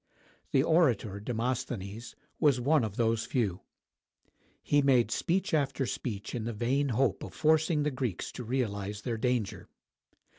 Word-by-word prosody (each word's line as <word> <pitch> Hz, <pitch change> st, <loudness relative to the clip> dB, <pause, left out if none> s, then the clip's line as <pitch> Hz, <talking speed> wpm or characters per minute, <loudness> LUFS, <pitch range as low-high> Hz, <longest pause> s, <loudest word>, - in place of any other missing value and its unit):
The 135 Hz, -, +3 dB
orator 130 Hz, -, +2 dB
Demosthenes 115 Hz, -2 st, -3 dB, 0.2 s
was 145 Hz, -5 st, +4 dB
one 145 Hz, +2 st, +3 dB
of 105 Hz, -2 st, -3 dB
those 115 Hz, -1 st, +1 dB
few. 105 Hz, -8 st, -1 dB, 1.0 s
He 145 Hz, 0 st, +3 dB
made 125 Hz, -5 st, +3 dB
speech 190 Hz, -, 0 dB
after 140 Hz, -3 st, +1 dB
speech 110 Hz, -4 st, -4 dB
in 120 Hz, -, -3 dB
the 115 Hz, -, -3 dB
vain 130 Hz, +6 st, 0 dB
hope 130 Hz, +2 st, +1 dB
of -, -, -8 dB
forcing 160 Hz, 0 st, +3 dB
the 150 Hz, -, 0 dB
Greeks 125 Hz, -8 st, -3 dB
to 125 Hz, -, -7 dB
realize 105 Hz, -4 st, -2 dB
their 115 Hz, -2 st, -2 dB
danger. 120 Hz, -5 st, -1 dB
125 Hz, 145 wpm, -30 LUFS, 110-140 Hz, 1.0 s, was